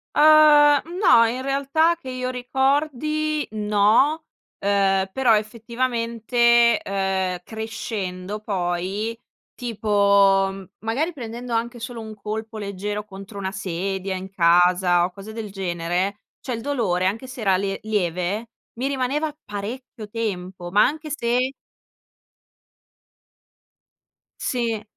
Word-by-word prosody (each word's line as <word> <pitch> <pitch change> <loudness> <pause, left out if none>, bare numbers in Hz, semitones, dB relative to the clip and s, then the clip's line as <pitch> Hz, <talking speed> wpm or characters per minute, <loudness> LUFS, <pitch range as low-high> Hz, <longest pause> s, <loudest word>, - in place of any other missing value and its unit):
Uhm, 295 -1 +7 0.2
no, 230 - +6
in 245 +3 -2
realtà 280 +5 +2
che 290 -6 -9
io 255 0 -3
ricordi 290 +4 0
no, 215 +9 +3 0.4
uhm, 195 -1 +2
però 240 -1 +3
effettivamente, 235 +1 +2
uhm, 190 -2 -1
crescendo 210 -3 -5
poi, 195 +3 -2 0.4
tipo 200 -4 +2
magari 280 +10 -1
prendendo 240 -2 -6
anche 235 +1 -2
solo 230 0 -6
un 220 -1 -8
colpo 215 +1 -6
leggero 205 +1 -4
contro 195 0 -10
una 190 -1 -3
sedia, 190 0 -3
in 185 +1 -6
casa 175 -1 +4
o 180 - -5
cose 200 +4 -10
del 220 -2 -6
genere, 180 +1 -2 0.2
cioè 255 - -4
il 230 - -4
dolore 220 -10 0
anche 225 +7 -2
se 255 -2 -8
era 195 -3 +3
le 195 +1 -2
lieve 200 +1 -1 0.3
mi 250 +3 -2
rimaneva 280 +3 -1
parecchio 215 +2 -7
tempo, 185 -5 -4
ma 205 +3 +5
anche 305 +3 -1
se 250 -1 0 2.9
Sì. 230 -4 -1
220 Hz, 115 wpm, -23 LUFS, 195-250 Hz, 2.9 s, Uhm